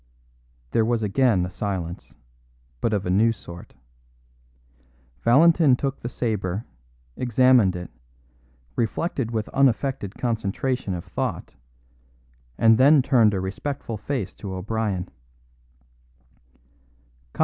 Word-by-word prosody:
There 115 - +3
was 115 0 0
again 105 -3 +2
a 90 - -7
silence, 95 -4 -5 0.7
but 115 - +1
of 100 -3 -1
a 90 - -1
new 110 +5 +4
sort. 85 -5 -11 1.5
Valentin 155 +3 +5
took 135 +1 -3
the 120 - -5
sabre, 105 -4 -2 0.5
examined 125 -6 +3
it, 90 -6 -7 0.8
reflected 120 +2 -1
with 110 -2 -2
unaffected 135 -5 0
concentration 115 -1 -2
of 85 - -7
thought, - - -4 1.0
and 115 -1 +5
then 140 +1 +6
turned 120 -7 +4
a - - -1
respectful 115 +6 -4
face 110 -4 -4
to 95 -2 -7
O'Brien. 100 -1 -2
115 Hz, 105 wpm, -24 LUFS, 95-130 Hz, 1.5 s, then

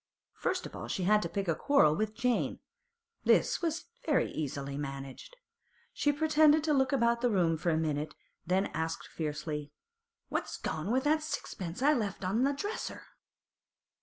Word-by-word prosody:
First - - -2
of - - -8
all - - -6
she 190 - -2
had 210 +3 +4
to - - -3
pick 200 -2 -2
a 165 - +3
quarrel 155 - +4
with 215 +3 -1
Jane; 250 +1 0 0.7
this - - +3
was 330 -1 -1 0.2
very - - +2
easily 140 -2 -4
managed. 140 - -6 0.6
She 290 - +2
pretended 305 0 +4
to 310 -1 +2
look 265 -2 +3
about 235 -3 +2
the 245 - +3
room 175 -6 +2
for 160 +2 -1
a 160 - +2
minute, 155 -1 -1 0.3
then 185 +3 +1
asked 160 +1 -2
fiercely: 150 -1 -4 0.6
'What's - - -3
gone 160 +4 -3
with 260 +2 +2
that 310 +1 +3
sixpence 190 - -4
I 295 +2 +6
left 205 -7 -2
on 205 +6 +1
the 275 +2 +3
dresser? 410 +10 -4
200 Hz, 165 wpm, -31 LUFS, -, 0.7 s, I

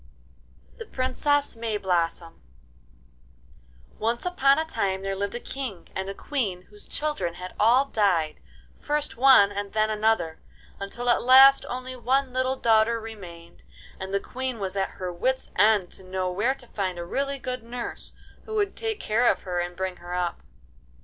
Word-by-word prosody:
THE 455 - -7
PRINCESS 280 +2 0
MAYBLOSSOM 180 -7 -1 1.7
Once 230 +5 -1
upon 275 -6 +3
a 320 - 0
time 195 -11 -1
there 195 0 -2
lived 200 +2 -3
a - - -3
King 245 -9 -6
and 190 0 -3
Queen 205 -11 -2
whose 210 +2 -13
children 295 - -2
had 180 +1 -8
all 240 +6 +5
died, 185 - +1 0.4
first 295 0 -2
one 250 -5 +6
and 200 0 -5
then 215 0 +2
another, 210 -7 +1 0.4
until 215 +5 -5
at 240 - +4
last 265 +2 +7
only 255 +1 -5
one 260 +1 0
little 260 +1 +1
daughter 230 -1 +3
remained, 180 -7 -11 0.4
and 190 0 -5
the 200 - +1
Queen 260 +2 -4
was 195 -2 -4
at 195 -1 0
her 180 -1 -6
wits' 260 +9 -1
end 205 -2 +4
to - - -8
know 185 0 -2
where 220 +9 +1
to 260 - -13
find 185 -3 -2
a 170 - -5
really 275 +8 -2
good 255 -2 -4
nurse 240 +1 -5 0.3
who 440 - -5
would 405 -2 0
take 445 -2 -3
care 235 +3 +3
of - - -5
her, 180 -2 -2
and 175 0 -3
bring 185 -1 -3
her 175 +1 -6
up. 175 -1 -2
220 Hz, 165 wpm, -26 LUFS, 190-260 Hz, 1.7 s, last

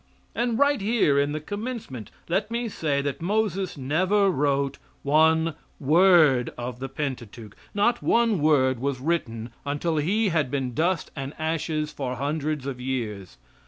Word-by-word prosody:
And 235 -1 0
right 285 -3 +3
here 200 -10 +2
in 145 +1 +1
the 155 - -2
commencement 205 - -6 0.2
let 195 +5 0
me 235 +1 -2
say 145 -7 -1
that 140 0 -3
Moses 195 -1 -1
never 185 +9 +2
wrote 140 -2 0 0.2
one 160 +2 +3 0.3
word 155 -4 +5
of 120 0 -5
the 135 +1 -5
Pentateuch 120 -6 -6 0.2
not 235 +4 +2
one 230 -5 +2
word 130 -5 +3
was 135 0 -2
written 120 -7 -2
until 150 +3 -1
he 200 +8 +1
had 155 -6 +1
been 130 -2 -2
dust 170 +6 0
and 135 -1 -5
ashes 155 -1 -2
for 130 -3 -3
hundreds 145 +1 -2
of 130 -3 -5
years. 105 - -4
150 Hz, 150 wpm, -25 LUFS, 130-185 Hz, 0.3 s, word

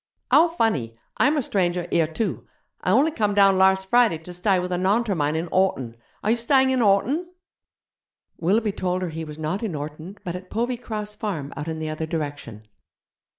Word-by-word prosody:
'How 325 +3 +7
funny! 215 - -1 0.2
Imer 290 -1 +3
stranger 180 -4 0
here 165 -2 +3
too. 180 +5 -3 0.3
I - - -1
only 270 - +4
come 210 -7 0
down 195 -2 +5
larse 190 0 +4
Friday 235 -4 +3
to 165 +3 -11
stye 185 +2 +1
with 180 0 -3
a 180 - 0
Naunter 205 +3 +1
mine 150 -1 0
in 160 +2 -1
Horton. 135 -11 +1 0.3
Are 215 - +2
you 235 - +2
stying 265 +2 +3
in 260 - +1
Horton?' 250 - +2 1.1
Willoughby 210 +5 +2
told 185 -2 -2
her 180 - -2
he 160 0 -5
was 150 -1 -8
not 160 +5 -2
in 210 -8 -3
Orton, 155 +6 -7
but 175 -1 -4
at 180 0 -9
Povey 240 +2 -1
Cross 210 -3 -5
Farm 165 -10 -4
out 145 +2 -5
in 160 -1 -3
the 155 0 -4
other 155 +1 -4
direction. 145 -9 -5
190 Hz, 195 wpm, -24 LUFS, 160-220 Hz, 1.1 s, How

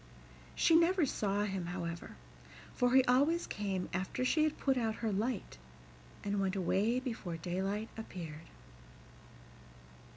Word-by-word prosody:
She 325 - +4
never 340 0 +5
saw 205 -5 0
him, 190 -4 -2
however, 170 -1 -5 0.6
for 245 +1 +2
he 265 - +8
always 285 +7 +3
came 195 -3 -2
after 190 +7 -1
she 310 +4 +3
had 310 - 0
put 270 -1 +1
out 225 -3 0
her 220 - +1
light, 210 - -2 0.6
and 200 0 0
went 190 0 0
away 200 +6 +1
before 225 -10 -4
daylight 190 +6 -2
appeared. 165 -8 -8
210 Hz, 130 wpm, -34 LUFS, 185-255 Hz, 0.6 s, he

